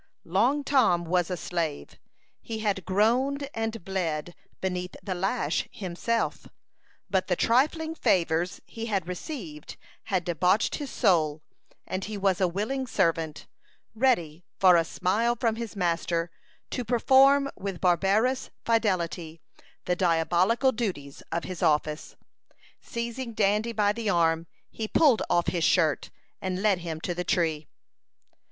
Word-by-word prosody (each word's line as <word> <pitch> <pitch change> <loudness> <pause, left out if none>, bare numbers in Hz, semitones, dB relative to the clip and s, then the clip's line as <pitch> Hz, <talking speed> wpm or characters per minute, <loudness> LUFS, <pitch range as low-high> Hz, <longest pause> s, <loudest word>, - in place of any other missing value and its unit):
Long 235 - +2
Tom 225 -12 +3
was 175 +1 +1
a 180 - -2
slave. 165 -3 -4 0.4
He 225 - -5
had 205 -5 -1
groaned 250 +9 +1
and 225 -4 -3
bled 175 -4 -2 0.3
beneath 180 -1 -3
the 195 - -2
lash 195 +7 -1
himself; 205 +5 -2 0.6
but 190 -2 0
the 180 - +1
trifling 310 - +2
favors 175 - +1
he 225 0 -6
had 195 -6 -1
received 180 - -7 0.3
had 190 -5 0
debauched 180 +4 +1
his 285 -2 -5
soul, 160 - +2 0.4
and 185 +1 -4
he 210 -1 -5
was 195 -1 +1
a 185 - +4
willing 220 +9 -2
servant, 165 -7 0 0.5
ready, 180 - +1 0.2
for 185 -2 +7
a 165 - +4
smile 210 +8 0
from 230 -3 +1
his 230 -2 -6
master, 170 -2 -1 0.4
to 250 - -2
perform 265 +4 +5
with 195 -3 -5
barbarous 195 +8 +2 0.2
fidelity 180 -7 0 0.5
the 180 - +1
diabolical 180 +8 +2
duties 185 - -4
of 170 - -1
his 185 -1 -6
office. 150 -2 0 0.7
Seizing 235 +1 -5
Dandy 210 +2 +2
by 210 -2 +2
the 225 -1 -2
arm, 165 -2 +2 0.2
he 220 - -4
pulled 270 -1 +4
off 175 - +2
his 170 -3 -1
shirt, 160 -5 +2 0.3
and 185 +1 -3
led 200 -4 +3
him 165 -2 -5
to 175 - -2
the 180 +1 -3
tree. 160 -4 0
190 Hz, 135 wpm, -27 LUFS, 170-230 Hz, 0.7 s, for